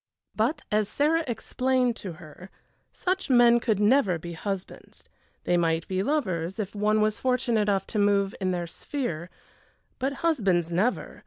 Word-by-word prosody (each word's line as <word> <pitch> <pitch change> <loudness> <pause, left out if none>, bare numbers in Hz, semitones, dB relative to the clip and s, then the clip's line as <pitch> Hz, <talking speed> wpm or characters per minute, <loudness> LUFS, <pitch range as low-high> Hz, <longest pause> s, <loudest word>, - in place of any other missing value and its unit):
But, 255 +8 0
as 210 -1 +1
Sarah 315 +7 +2
explained 255 0 0
to 185 -4 -6
her, 165 +3 -13 0.4
such 375 -2 -2
men 240 -2 +6
could 220 -4 0
never 210 -4 +3
be 170 +2 -8
husbands. 195 +2 -6 0.4
They 175 - +2
might 165 -1 0
be 185 0 -1
lovers, 190 - -1
if 205 -3 -4
one 210 +1 +1
was 215 0 +1
fortunate 250 -3 +1
enough 200 -2 +1
to 215 - 0
move 200 -1 +2
in 185 - 0
their 175 -1 -1
sphere, 170 - -4 0.7
but 270 +2 -1
husbands 190 - +1
never! 195 +9 -1
210 Hz, 155 wpm, -26 LUFS, 180-250 Hz, 0.7 s, men